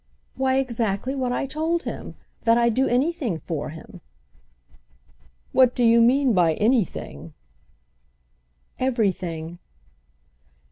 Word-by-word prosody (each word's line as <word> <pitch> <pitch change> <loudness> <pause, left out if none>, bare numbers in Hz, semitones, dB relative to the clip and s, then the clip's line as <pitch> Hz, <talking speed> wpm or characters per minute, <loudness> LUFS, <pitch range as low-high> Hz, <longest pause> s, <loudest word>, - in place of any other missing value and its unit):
"Why 265 0 +1
exactly 235 -2 -1
what 260 -3 -2
I 250 - -1
told 320 +5 -1
him. - - -7 0.3
That 230 0 +5
I'd 235 -1 +3
do 265 +4 +2
anything 255 - 0
for 160 -2 -5
him." 160 +2 -12 1.5
"What 255 -2 +4
do 245 - +1
you 230 0 +5
mean 255 +2 +4
by 170 -4 +3
'anything'?" 210 - -1 1.4
"Everything." 180 -9 -2
235 Hz, 105 wpm, -23 LUFS, 195-265 Hz, 1.5 s, That